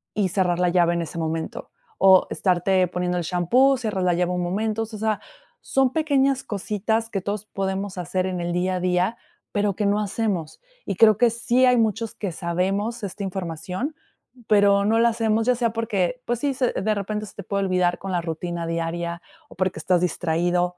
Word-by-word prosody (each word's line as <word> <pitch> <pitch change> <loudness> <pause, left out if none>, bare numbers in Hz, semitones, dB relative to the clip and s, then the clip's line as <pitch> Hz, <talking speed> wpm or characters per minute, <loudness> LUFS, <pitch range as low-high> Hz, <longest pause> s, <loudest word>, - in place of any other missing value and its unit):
y 200 -3 +1
cerrar 180 -2 +1
la 180 0 +2
llave 175 -1 +3
en 170 - -1
ese 170 +1 -6
momento 160 0 -4 0.3
o 190 -1 +6
estarte 185 0 +2
poniendo 180 0 -1
el 175 - -2
champú, 240 +11 +3
cerrar 210 -6 -2
la 175 -1 +2
llave 180 0 0
un 180 0 -1
momento, 215 +5 -1
o - - -1
sea, 215 -1 -2 0.4
son 265 -1 +1
pequeñas 275 -4 +2
cositas 220 +2 -2
que 195 -3 -2
todos 205 +2 -4
podemos 195 -1 -3
hacer 185 +1 -1
en 185 -2 -3
el 175 0 -2
día 185 +1 0
a - - -3
día, 180 +4 +1 0.3
pero 205 -2 0
que 205 0 -1
no 205 +1 +2
hacemos, 195 -6 -2 0.2
y 195 - -3
creo 215 0 +6
que 240 -1 +5
sí 240 +2 +1
hay 250 -1 +4
muchos 225 0 0
que 200 -4 -4
sabemos 195 +8 -2
esta 200 +1 -5
información, 185 - -4 0.5
pero 200 -1 +4
no 225 +2 +3
la 235 0 +5
hacemos, 225 -1 0
ya 250 - +4
sea 235 -1 +1
porque, 230 +1 -1
pues 240 -1 -1
sí, 285 0 0
se 250 -1 +1
de 215 +2 0
repente 210 +2 -3
se - - -14
te 200 - -7
puede 200 +1 -1
olvidar 180 -1 +1
con 195 - -5
la 175 - +1
rutina 170 +1 -4
diaria 170 +1 -3 0.3
o - - -13
porque 185 -2 -1
estás 180 +1 +2
distraído, 175 +1 0
195 Hz, 200 wpm, -23 LUFS, 180-220 Hz, 0.5 s, o